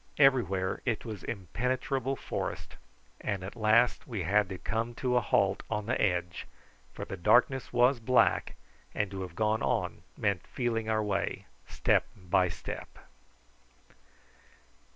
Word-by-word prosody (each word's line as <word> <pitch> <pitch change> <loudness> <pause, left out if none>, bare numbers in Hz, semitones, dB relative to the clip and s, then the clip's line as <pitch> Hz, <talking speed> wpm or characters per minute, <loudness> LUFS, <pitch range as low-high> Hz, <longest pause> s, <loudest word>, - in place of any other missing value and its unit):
Everywhere 115 - +3
it 120 -3 -1
was 110 -5 -6
impenetrable 125 - -2
forest, - - -5 0.4
and 100 -2 -3
at 95 - -7
last 115 +2 +3
we 110 -8 -3
had 100 +3 +2
to 95 - -5
come 115 +5 -2
to 125 0 0
a 125 - +4
halt 100 -2 +2
on 105 -2 -2
the 120 - 0
edge, 90 -3 0 0.4
for - - -6
the - - -5
darkness 125 +8 +3
was 125 +1 +4
black, 125 +2 +2 0.4
and 105 -1 -1
to 95 -1 -5
have 90 -3 -7
gone 110 0 +1
on - - -1 0.2
meant 100 -3 0
feeling 115 -3 -2
our 110 -1 +1
way 100 -2 -2 0.2
step - - +2
by 90 -1 +1
step. - - -7
110 Hz, 140 wpm, -30 LUFS, 95-120 Hz, 0.4 s, a